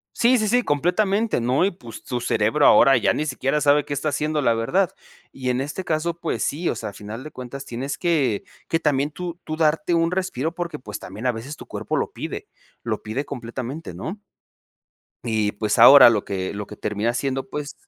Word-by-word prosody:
sí, 250 +2 +4
sí, 215 - +1
sí, 245 +4 +3
completamente, 195 - +1
¿no? 125 +7 +2
Y 195 - +2
pues, 120 - -11
tu 125 -1 -3
cerebro 115 +5 +2
ahora 135 0 +7
ya 105 - +2
ni 150 - -1
siquiera 135 +1 -1
sabe 145 0 +4
qué 145 - -3
está 145 +2 -1
haciendo 150 +1 -1
la 120 - +3
verdad. 165 +12 +1 0.4
Y 130 -1 -5
en 125 +1 +1
este 155 +7 -5
caso, 165 +1 -1
pues 170 - -1
sí, 165 +5 -1
o - - 0
sea, 110 - -5
a - - -14
final 105 +6 -8
de 155 - -8
cuentas 130 +2 -8
tienes 130 +4 -4
que 145 - +1 0.2
que 165 - +1
también, 145 -2 +1
tú 175 +2 -6
tú 155 - -4
darte 160 +1 +1
un 165 0 +2
respiro, 170 -4 -2
porque, 170 -4 -4
pues, 105 -4 -7
también 105 +7 -7
a 125 - +3
veces 125 +7 -7
tu - - -10
cuerpo - - -3
lo - - -1
pide - - -6 0.4
lo - - -3
pide 115 +7 -3
completamente, 130 +4 -6
¿no? 195 +6 -6 1.1
Y 110 -3 0
pues, 105 +2 -1
ahora 125 +1 +10
lo 105 -3 0
que 95 -2 -3
lo 100 0 -5
que 105 - -10
termina 105 +4 -1
siendo, 135 +1 -2
pues 150 0 -5
140 Hz, 210 wpm, -23 LUFS, 115-165 Hz, 1.1 s, ahora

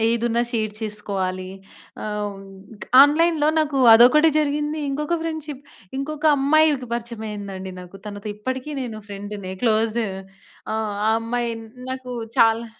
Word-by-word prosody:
ఏదున్నా 235 0 +1
షేర్ 215 -2 -1
చేసుకోవాలి. 195 -3 -3 0.6
ఆహ్, 210 -1 -2
హ్మ్, 195 0 -12 0.6
ఆన్‌లైన్‌లో 305 +1 +3
నాకు 285 -3 0 0.2
అదొకటి 300 +7 +7
జరిగింది. 300 +1 -1
ఇంకొక 300 +5 -1
ఫ్రెండ్‌షిప్ 305 -4 -5 0.3
ఇంకొక 305 +2 -5
అమ్మాయికి 285 -2 +3
పరిచమయిందండి 210 -5 -6
నాకు. 180 +2 -12
తనతో 205 0 -7
ఇప్పటికీ 260 +6 -4
నేను 225 -4 -5
ఫ్రెండునే 200 -1 -6
క్లోజు. 225 0 +2 0.7
ఆ! - - 0 0.4
అమ్మాయి 235 +1 -2 0.4
నాకు 260 -1 -6 0.3
చాలా 230 +1 +4
235 Hz, 115 wpm, -22 LUFS, 210-290 Hz, 0.7 s, అదొకటి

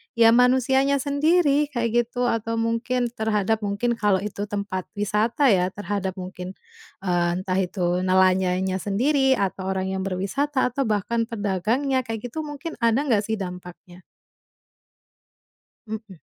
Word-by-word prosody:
ya 230 -1 +6
manusianya 260 +3 +4
sendiri 295 0 +3
kayak 240 -3 0
gitu, 245 +1 -3
atau 230 0 -2
mungkin 230 +2 -1
terhadap 220 -1 0
mungkin 205 +3 -1
kalau 200 -3 +2
itu 205 0 -4
tempat 200 -3 -4
wisata 215 +6 +2
ya, 180 -2 +3
terhadap 195 -1 -3
mungkin, 185 0 -7 0.5
eee, 175 -2 +1
entah 185 -1 0
itu 180 -1 0
nelayannya 185 0 +2
sendiri, 265 +7 +2
atau 190 -3 -2
orang 190 0 -1
yang 190 - -2
berwisata 250 +9 -1
atau 265 0 -1
bahkan 225 +2 0
pedagangnya 230 +6 -1
kayak 225 0 -4
gitu - - -5
mungkin 300 +1 -5
ada 235 +3 +2
nggak 225 -8 +2
sih 220 - 0
dampaknya? 180 -1 -9 1.8
Mhm. 215 -5 -7
215 Hz, 130 wpm, -24 LUFS, 190-250 Hz, 1.8 s, ya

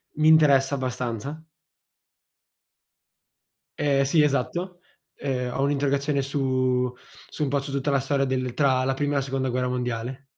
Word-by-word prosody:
mi 155 +1 +2
interessa 145 -3 +5
abbastanza. 130 +2 -4 2.4
Ehm, 140 -2 +3
sì, 145 +4 +3
esatto. 175 +6 -1 0.4
Ehm, 125 -3 -3
ho - - -2
un'interrogazione 140 0 +1
su 130 -2 0 0.4
su - - -4
un - - 0
po' 140 +1 +1
su 140 0 -7
tutta 140 +1 -1
la 140 - +3
storia 135 0 0
del 130 -2 -2
tra 130 -2 +2
la 135 +1 +1
Prima 145 +2 -1
e - - 0
la 140 - +2
Seconda 135 0 -2
Guerra 125 0 -1
Mondiale. 125 +1 -3
135 Hz, 150 wpm, -25 LUFS, 130-145 Hz, 2.4 s, interessa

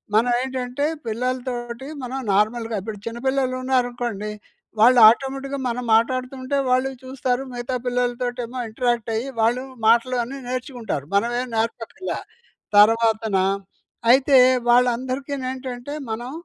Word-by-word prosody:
మనం 235 +3 +4
ఏంటంటే, 260 +1 -2 0.2
పిల్లలతోటి 245 +1 -3 0.2
మనం 255 +2 -4
నార్మల్‌గా 225 +3 +1
ఇప్పుడు 215 +1 -6
చిన్న 230 0 -5
పిల్లలున్నారనుకోండి. 250 -5 -1 0.5
వాళ్ళు 245 +3 +7
ఆటోమేటిక్‌గా 270 +3 -2
మనం 245 +1 -3
మాట్లాడుతుంటే 255 +3 0
వాళ్ళు 255 +1 +2
చూస్తారు, 260 0 -2
మిగతా 245 +1 -3
పిల్లలతోటి 245 0 -1
ఏమో 245 +3 -9
ఇంటరాక్ట్ 240 0 -1
అయ్యి, 240 +5 -2
వాళ్ళు 240 +3 +2 0.2
మాటలు 235 +3 +4
అన్నీ 270 +4 -7
నేర్చుకుంటారు. 245 - -4
మనమేం 240 +5 +1
నేర్పక్కర్లా. 230 +9 -3 0.6
తర్వాతన 220 0 +4 0.8
అయితే 265 +1 +5 0.3
వాళ్ళందరికి 255 +3 +2
నేంటంటే, 255 +1 -5 0.2
మనం 240 +4 -4
245 Hz, 110 wpm, -22 LUFS, 230-260 Hz, 0.8 s, వాళ్ళు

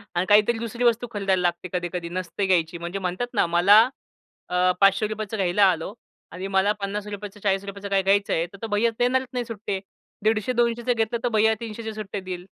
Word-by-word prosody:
आणि 175 - +1
काहीतरी 210 +3 +5
दुसरी 235 +1 -4
वस्तू 240 0 +2
खरीद्ययला 195 -3 0
लागते 175 0 -1
कधी-कधी, 175 -1 -3
नसते 185 +2 -3
घ्यायची. 170 -2 +1
म्हणजे 170 +3 -5
म्हणतात 185 +5 -2
ना 215 - +3
मला 180 +6 +6 0.7
अ, 180 0 +3
₹500 215 +2 +2
चं 220 +2 -5
घ्यायला 195 +1 +3
आलो 165 +4 -4 0.4
आणि 185 +3 -5
मला 195 +2 +4
₹50 205 +1 -5
चं, 205 - -17
₹40 200 0 -2
चं 200 - -3
काही 195 -1 +2
घ्यायचं 200 +1 +2
आहे, 165 +1 +1
तर 200 +3 -14
तो 225 - -3
भैय्या 215 +2 +2
देणारच 255 +2 +2
नाही 245 -1 -2
सुट्टे. 205 -3 -4 0.4
150-200च 235 +2 +1
घेतलं 225 +1 -1
तर 245 - +1
भैय्या 220 +1 +4
300चे 220 -1 -6
सुट्टे 210 -1 -5
देईल. 180 -1 -6
200 Hz, 190 wpm, -24 LUFS, 185-220 Hz, 0.7 s, मला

